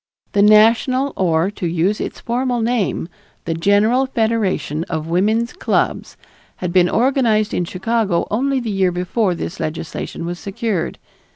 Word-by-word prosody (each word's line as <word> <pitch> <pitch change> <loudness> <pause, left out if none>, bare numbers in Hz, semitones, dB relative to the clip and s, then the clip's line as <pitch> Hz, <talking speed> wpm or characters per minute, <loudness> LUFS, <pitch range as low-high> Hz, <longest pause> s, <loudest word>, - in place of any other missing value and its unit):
The 200 - +2
national 230 +6 +4
or, 170 0 +1
to 185 -4 -4
use 175 +5 0
its - - -5
formal 245 +1 -1
name, 225 -7 -1 0.4
The 165 - -1
General 205 +9 +2
Federation 220 - -1
of 160 -2 -4
Woman's 215 +8 +1
Clubs 365 - -1 0.4
had 180 -1 -4
been 180 -1 +4
organized 230 -4 +2
in 180 - 0
Chicago 190 0 0
only 265 +5 +1
the 235 -3 -3
year 190 -2 +1
before 180 +2 0
this 170 +2 -6
legislation 160 +1 -5
was 175 +1 -5
secured. 200 -3 -3
205 Hz, 145 wpm, -19 LUFS, 175-235 Hz, 0.4 s, national